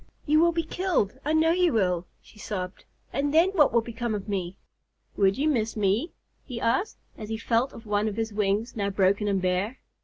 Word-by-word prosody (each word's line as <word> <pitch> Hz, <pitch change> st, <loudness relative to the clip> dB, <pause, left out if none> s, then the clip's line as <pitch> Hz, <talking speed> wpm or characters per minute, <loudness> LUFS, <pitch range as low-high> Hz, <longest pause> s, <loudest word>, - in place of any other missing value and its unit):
"You 305 Hz, +1 st, +4 dB
will 340 Hz, +1 st, +5 dB
be 330 Hz, 0 st, -1 dB
killed, 320 Hz, -, -1 dB
I 305 Hz, -, 0 dB
know 320 Hz, +1 st, +4 dB
you 355 Hz, -1 st, +3 dB
will," 180 Hz, -5 st, +1 dB, 0.2 s
she 210 Hz, -, -18 dB
sobbed. 185 Hz, -3 st, -5 dB, 0.3 s
"And 285 Hz, +1 st, 0 dB
then 330 Hz, +5 st, +4 dB
what 310 Hz, -8 st, +4 dB
will 235 Hz, -, +3 dB
become 235 Hz, -1 st, -3 dB
of 205 Hz, 0 st, -6 dB
me?" 190 Hz, -2 st, -3 dB, 0.6 s
"Would 195 Hz, -1 st, +3 dB
you 290 Hz, +3 st, +1 dB
miss 225 Hz, -7 st, 0 dB
me?" 210 Hz, -, +1 dB, 0.3 s
he 245 Hz, -3 st, -6 dB
asked, 305 Hz, -, 0 dB, 0.2 s
as 215 Hz, -1 st, -7 dB
he 220 Hz, -, -2 dB
felt 230 Hz, +3 st, +1 dB
of 230 Hz, -, -12 dB
one 210 Hz, 0 st, 0 dB
of 210 Hz, 0 st, -4 dB
his 225 Hz, -1 st, -2 dB
wings, 210 Hz, +3 st, 0 dB
now 200 Hz, -2 st, -1 dB
broken 200 Hz, +1 st, +2 dB
and 195 Hz, -1 st, +1 dB
bare. 185 Hz, +7 st, -1 dB
225 Hz, 210 wpm, -26 LUFS, 200-290 Hz, 0.6 s, will